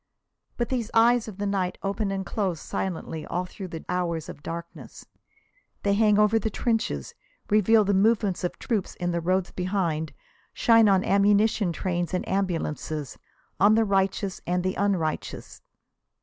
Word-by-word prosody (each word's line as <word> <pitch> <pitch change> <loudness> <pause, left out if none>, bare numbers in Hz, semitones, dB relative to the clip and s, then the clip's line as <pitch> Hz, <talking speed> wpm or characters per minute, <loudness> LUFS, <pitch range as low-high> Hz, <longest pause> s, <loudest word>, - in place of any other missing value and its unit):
But 240 - -1
these 240 -4 -2
eyes 235 +1 +4
of 205 -4 -8
the 205 - -2
night 195 -3 -1
open 200 +1 -1
and 195 -1 -3
close 185 -3 -2
silently 160 -4 -4
all 180 +1 -2
through 185 +1 -8
the 165 -2 -8
hours 170 -3 -2
of - - -9
darkness. 170 +2 -8 0.8
They 200 - +2
hang 210 0 +4
over 210 +1 +4
the 220 - -1
trenches, 215 - -2 0.4
reveal 215 +1 +5
the 200 0 +1
movements 205 -2 +2
of 180 - -2
troops 215 -6 -2
on 175 0 -1
the 170 0 -1
roads 185 +2 0
behind, 180 -4 -1 0.4
shine 225 -2 +5
on 190 -1 +3
ammunition 205 0 +3
trains 175 +1 -2
and 180 - -3
ambulances, 160 -6 -2 0.4
on 205 +3 +6
the 225 0 +3
righteous 195 -1 0
and 180 0 0
the 185 0 0
unrighteous. 190 -7 -2
195 Hz, 155 wpm, -26 LUFS, 175-210 Hz, 0.8 s, on